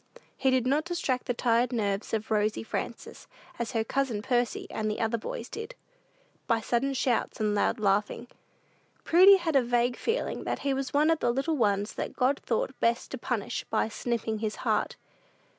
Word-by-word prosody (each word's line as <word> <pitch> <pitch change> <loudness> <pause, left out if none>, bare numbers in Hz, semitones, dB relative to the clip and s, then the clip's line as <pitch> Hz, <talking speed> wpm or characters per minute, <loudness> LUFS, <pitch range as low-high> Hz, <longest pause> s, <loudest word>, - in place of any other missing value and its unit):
He 265 - +1
did 260 -2 +2
not 285 +4 +2
distract 315 -8 -2
the 245 - 0
tired 240 +1 +2
nerves 205 -4 -1
of 220 0 -2
"Rosy 215 0 +1
Frances," - - -6 0.3
as 235 +2 -3
her 225 -1 +1
cousin 235 -3 -1
Percy 245 -1 0
and 215 -1 -1
other 225 +1 0
boys 230 +2 -5
did, 450 - -7 0.7
by 230 - +2
sudden 245 +5 0
shouts 250 -3 0
and 210 -1 +1
loud 210 +3 +1
laughing. 205 +3 +1 0.8
Prudy 375 +4 +7
had 335 -4 -2
a 270 - +6
vague 240 0 +1
feeling 460 +2 -2
that - - -2
he 275 - +2
was 270 0 -3
one 300 +3 +3
of 325 - +1
the - - +1
little 275 +6 0
ones 205 -4 +1
that - - -5
God 265 +3 +2
thought 240 +2 -1
best 235 0 0
to 260 - -5
punish 235 -5 -2
by - - +1
"snipping 225 -1 -2
his 215 -1 -2
heart." - - +1
240 Hz, 180 wpm, -28 LUFS, 220-270 Hz, 0.8 s, Prudy